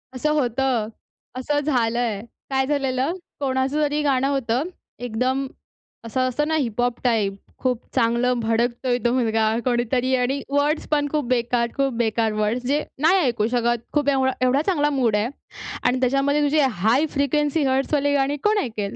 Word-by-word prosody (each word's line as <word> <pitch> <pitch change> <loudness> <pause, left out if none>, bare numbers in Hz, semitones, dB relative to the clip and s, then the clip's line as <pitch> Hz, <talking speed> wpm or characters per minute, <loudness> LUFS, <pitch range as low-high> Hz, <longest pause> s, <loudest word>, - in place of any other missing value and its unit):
असं 300 +4 0
होतं, 245 -3 0 0.5
असं 290 +3 0
झालंय. 235 -6 0 0.3
काय 265 0 +1
झालेलं, 270 +1 0 0.3
कोणाचं 270 +2 0
तरी 295 0 +1
गाणं 270 -2 +2
होतं. 265 -2 0 0.4
एकदम 255 +3 -1 0.6
असं 255 +3 0
असतं 295 +5 -1
ना, 315 - 0
हिपहॉप 245 -3 -1
टाइप 220 -5 +1 0.3
खूप 250 -3 0 0.2
चांगलं 240 0 +2
भडकतोय 235 +2 0
तो 240 - +4
मुलगा 225 -3 +1 0.2
कोणीतरी 245 +1 +1
आणि 260 +2 0
वर्ड्स 290 +2 0
पण 290 -1 +1
खूप 300 -3 0
बेकार-खूप 245 +2 0
बेकार 225 -1 +1
वर्ड्स. 215 +4 -1
जे 295 +2 +1 0.2
नाही 350 +5 +5
ऐकू 235 - +1
शकत 240 -1 0
खूप 290 -1 +2
एवढा 265 -1 +2
एवढा 265 +3 +3
चांगला 295 -6 +2
मूड 255 -7 +1
आहे 210 +2 +1 0.6
आणि 250 +1 +2
त्याच्यामध्ये 275 +3 +2
तुझी 290 +1 +2
हाय 250 - +2
फ्रिक्वेन्सी 295 +2 +1
हर्ट्सवाले 275 +2 +1
गाणी 280 +1 +1
कोण 425 +1 +3
ऐकेल? 215 -4 -4
260 Hz, 150 wpm, -22 LUFS, 235-285 Hz, 0.6 s, नाही